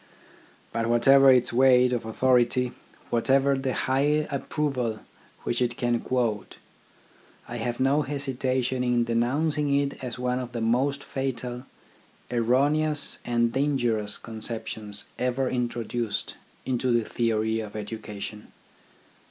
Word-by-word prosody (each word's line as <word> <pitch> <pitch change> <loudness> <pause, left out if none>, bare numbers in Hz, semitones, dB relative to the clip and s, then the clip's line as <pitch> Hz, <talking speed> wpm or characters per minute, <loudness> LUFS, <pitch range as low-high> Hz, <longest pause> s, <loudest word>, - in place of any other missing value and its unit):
But 115 0 0
whatever 135 +4 +6
its 125 -2 +3
weight 125 0 +5
of 115 -2 -2
authority, 125 +1 +2 0.4
whatever 135 +3 +3
the 135 -1 -2
high 145 +3 +1
approval 135 -6 -2 0.4
which 120 - -1
it 120 -1 0
can 120 -1 +1
quote, 115 -5 -2 0.9
I 120 - -5
have 120 +1 -3
no 135 +3 +3
hesitation 130 -3 -1
in 120 -1 +2
denouncing 140 +6 +1
it 140 -1 -3
as 125 -2 -4
one 125 0 -1
of 125 -1 -6
the 120 - -3
most 130 +5 +1
fatal, 125 -1 -4 0.6
erroneous, 145 +6 +1
and 120 -1 +1
dangerous 120 -7 0
conceptions 110 -2 -5
ever 125 +1 0
introduced 120 -3 -2 0.3
into 130 -1 0
the 120 -2 +1
theory 110 -1 0
of 110 -1 -7
education. 105 -1 -7
125 Hz, 120 wpm, -26 LUFS, 115-135 Hz, 0.9 s, whatever